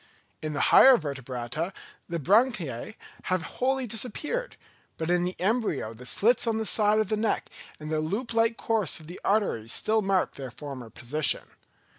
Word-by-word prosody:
In 155 -1 -3
the 145 - +1
higher 265 -2 +9
Vertebrata 135 - -4 0.4
the 170 - -2
branchiæ 190 - +1 0.3
have 185 -2 0 0.2
wholly 265 0 +1
disappeared—but 245 - -4
in 175 0 +2
the 180 - -5
embryo 195 - 0
the 125 +3 -10
slits 235 - +3
on 225 -1 +1
the 220 - -2
sides 215 +1 +4
of 210 - -3
the 215 - +1
neck 220 0 -1 0.3
and 155 0 -7
the 155 - +1
loop 215 +10 -3
like 230 0 +2
course 220 -8 0
of 160 - -13
the 175 +3 -10
arteries 195 - 0
still 220 0 +2
mark 195 -2 +1
their 135 -2 -6
former 130 -2 -8
position. 140 +6 +1
185 Hz, 165 wpm, -27 LUFS, 150-225 Hz, 0.4 s, higher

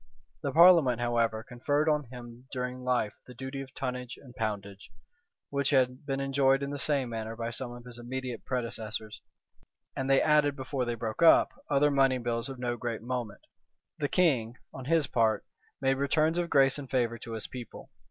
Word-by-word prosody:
The 140 - -2
parliament, 160 -7 +6
however, 115 -2 0
conferred 145 +5 -1
on 150 -2 +2
him 120 0 -11
during 125 -1 -4
life 125 -4 0
the 125 - -11
duty 130 +2 -5
of 135 -1 -9
tonnage 125 -1 -4
and 125 -3 -15
poundage, 100 -3 -4 0.6
which 140 -1 +1
had 130 0 +1
been 135 -1 -1
enjoyed 135 0 +2
in 140 - -3
the 145 - -4
same 135 -2 0
manner 110 -1 -4
by 115 0 -4
some 120 +1 -4
of 120 0 -10
his 120 -1 -9
immediate 125 +1 -5
predecessors; 110 -3 -4 0.7
and 135 0 -2
they 135 - +6
added, 150 -2 +3
before 130 -1 -3
they 120 0 -2
broke 110 +2 -4
up, 165 - +7 0.2
other 145 +1 +3
money 135 -2 +3
bills 120 +1 -2
of 135 - -7
no 120 -1 -2
great 120 -2 -4
moment. 120 -4 -4 0.6
The 145 - 0
king, 130 -11 +2 0.2
on 130 - -8
his 160 +1 +2
part, 110 -5 +1 0.3
made 135 0 +1
returns 155 +4 +2
of 170 -1 -1
grace 135 0 +4
and 135 -2 -8
favor 120 -3 0
to 115 0 -7
his 110 - -4
people. 125 -3 -9
125 Hz, 185 wpm, -29 LUFS, 120-140 Hz, 0.7 s, up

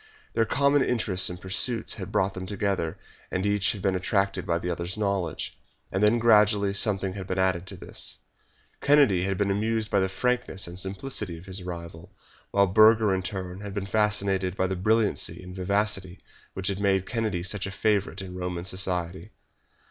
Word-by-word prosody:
Their 115 - +2
common 140 +3 +3
interests 105 -8 +1
and 90 0 -7
pursuits 110 +6 0
had - - -6
brought 95 0 +1
them 95 0 -6
together, 100 -5 -1 0.3
and 95 +2 -2
each 105 +1 +2
had 100 -3 -8
been 95 - +2
attracted 95 0 0
by 85 - +2
the 90 +1 -3
other's 85 +3 -3
knowledge. 100 -6 -2 0.4
And 95 - -1
then 105 +3 +5
gradually 105 -3 +4
something 100 -2 +1
had 95 -2 -7
been 95 - -2
added 95 -1 +1
to - - -5
this. - - -5 0.6
Kennedy 140 -11 +4
had 95 -1 -1
been 100 0 +1
amused 110 +2 0
by 100 - +3
the 95 0 +1
frankness 125 -1 -1
and 85 +1 -6
simplicity 95 -1 -3
of 85 - -13
his 95 0 -4
rival, 85 +1 -8 0.3
while 100 0 +4
Burger 110 +1 +5
in 95 - 0
turn 95 0 -5
had 100 -1 -7
been 100 -1 -2
fascinated 100 -2 0
by 95 - +2
the 95 0 -1
brilliancy 110 +3 +1
and 90 0 -9
vivacity 95 -1 -1 0.4
which 95 +1 -1
had 100 -1 -2
made 95 -2 +2
Kennedy 110 -7 -2
such 95 +1 -2
a - - -5
favourite 100 -1 0
in 90 -1 -8
Roman 90 -1 -4
society. 95 0 -2
95 Hz, 185 wpm, -27 LUFS, 90-105 Hz, 0.6 s, then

